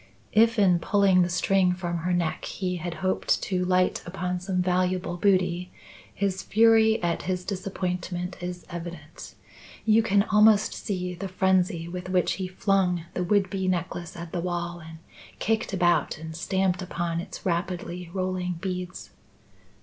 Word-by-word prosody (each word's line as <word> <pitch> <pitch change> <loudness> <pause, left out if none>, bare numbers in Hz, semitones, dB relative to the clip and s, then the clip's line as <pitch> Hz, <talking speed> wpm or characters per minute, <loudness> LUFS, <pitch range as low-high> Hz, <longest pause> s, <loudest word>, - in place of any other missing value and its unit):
If 225 +1 +4
in 185 -4 +4
pulling 195 0 +4
the 175 - +2
string 180 +1 +2
from 175 -1 -3
her 175 +2 -2
neck 175 -3 -1
he 180 -2 -3
had 170 0 -5
hoped 185 - +1
to 185 -2 0
light 180 0 +2
upon 180 0 -3
some 185 0 -2
valuable 180 0 0
booty, 180 -2 +1 0.4
his 190 -1 -1
fury 225 0 +4
at 170 -1 0
his 180 -1 -2
disappointment 180 -2 -3
is 180 0 -5
evident. 170 -2 -8 0.5
You 220 0 +5
can 200 -2 +3
almost 210 0 +4
see 180 -3 -3
the 180 +3 -5
frenzy 185 -2 +1
with 180 +1 -6
which 180 -1 +2
he 185 - -2
flung 185 -2 +1
the 180 - -1
would 195 +1 +2
be 190 -2 -2
necklace 175 -2 -2
at 170 -1 -7
the 175 - -2
wall, 175 0 -3
and 160 0 -11 0.4
kicked 220 +1 0
about 175 -5 +2
and 160 +1 -8
stamped 190 +2 0
upon 170 -2 -2
its - - -9
rapidly 175 0 -2
rolling 185 -1 -2
beads. 180 +1 -5
180 Hz, 155 wpm, -26 LUFS, 175-190 Hz, 0.5 s, You